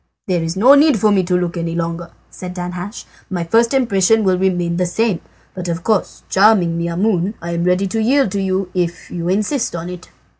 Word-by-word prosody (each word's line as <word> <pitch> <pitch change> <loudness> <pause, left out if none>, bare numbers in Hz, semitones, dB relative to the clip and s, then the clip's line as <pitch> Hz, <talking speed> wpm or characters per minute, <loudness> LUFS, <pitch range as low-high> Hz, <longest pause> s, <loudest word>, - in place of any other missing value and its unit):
"There 180 -3 0
is 165 +2 -3
no 250 +8 +7
need 285 -2 +5
for 215 +1 +3
me 195 -2 +3
to 180 0 0
look 175 -1 -2
longer," 170 0 -3 0.2
said 180 -1 -8
Danhasch, 180 +3 -6 0.3
"my 180 -3 -2
first 230 +7 +2
impression 225 -5 +2
will 190 -2 +3
remain 175 -2 0
the 180 0 0
same; 200 0 0 0.3
but 180 -1 -6
of 170 0 -3
course, 215 -2 -1
charming 190 -4 +3
Maimoune, 175 +4 -1
I 170 +1 -6
am 170 0 -1
ready 180 +2 +2
to 225 +4 -1
yield 265 -1 +2
to 200 0 -1
you 190 -1 -1
if 175 -2 -3
you 170 0 -3
insist 215 +4 -1
on 170 +1 -5
it." 180 0 -9
180 Hz, 200 wpm, -18 LUFS, 170-210 Hz, 0.3 s, no